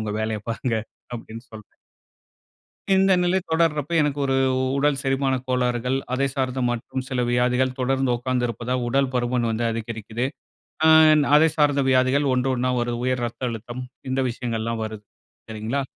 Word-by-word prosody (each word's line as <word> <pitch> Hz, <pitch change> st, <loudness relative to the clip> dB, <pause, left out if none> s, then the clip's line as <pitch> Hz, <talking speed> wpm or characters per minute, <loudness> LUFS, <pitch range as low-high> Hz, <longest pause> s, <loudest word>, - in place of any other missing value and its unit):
உங்க 105 Hz, -, -3 dB
வேலையை 110 Hz, -1 st, -2 dB
பாருங்க"அப்டின்னு 115 Hz, 0 st, -5 dB
சொல்கிறேன். 105 Hz, -1 st, -13 dB, 1.2 s
இந்த 190 Hz, 0 st, +4 dB
நிலை 180 Hz, +2 st, +2 dB
தொடர்றப்போ, 160 Hz, -1 st, +1 dB
எனக்கு 145 Hz, -1 st, -1 dB
ஒரு 135 Hz, -1 st, +1 dB, 0.4 s
உடல் 145 Hz, 0 st, +2 dB
செரிமான 135 Hz, 0 st, 0 dB
கோளாறுகள், 125 Hz, 0 st, 0 dB, 0.2 s
அதைச் 135 Hz, +1 st, 0 dB
சார்ந்த 130 Hz, -1 st, -1 dB
மற்றும் 120 Hz, +2 st, -4 dB
சில 125 Hz, -1 st, -1 dB
வியாதிகள், 125 Hz, +1 st, +2 dB
தொடர்ந்து 135 Hz, 0 st, +1 dB
உக்காந்திருப்பதால் 125 Hz, 0 st, -2 dB
உடல் 135 Hz, +1 st, +1 dB
பருமன் 120 Hz, -1 st, 0 dB
வந்து 110 Hz, +1 st, -2 dB
அதிகரிக்குது. 115 Hz, +1 st, -4 dB, 0.6 s
அன் 155 Hz, -1 st, +7 dB
அதை 160 Hz, +2 st, +6 dB
சார்ந்த 145 Hz, -2 st, +3 dB
வியாதிகள், 130 Hz, +2 st, +3 dB
1 130 Hz, +1 st, +1 dB
1 125 Hz, +1 st, 0 dB
வருது. 120 Hz, 0 st, -2 dB
உயர் 130 Hz, -1 st, 0 dB
ரத்த 120 Hz, +1 st, -4 dB
அழுத்தம், 120 Hz, +3 st, -6 dB, 0.3 s
இந்த 130 Hz, -, 0 dB
விஷயங்கள்லாம் 115 Hz, -1 st, -3 dB
வருது. 110 Hz, -1 st, -8 dB, 0.5 s
சரிங்களா, 110 Hz, +6 st, -2 dB
125 Hz, 140 wpm, -23 LUFS, 120-135 Hz, 1.2 s, அன்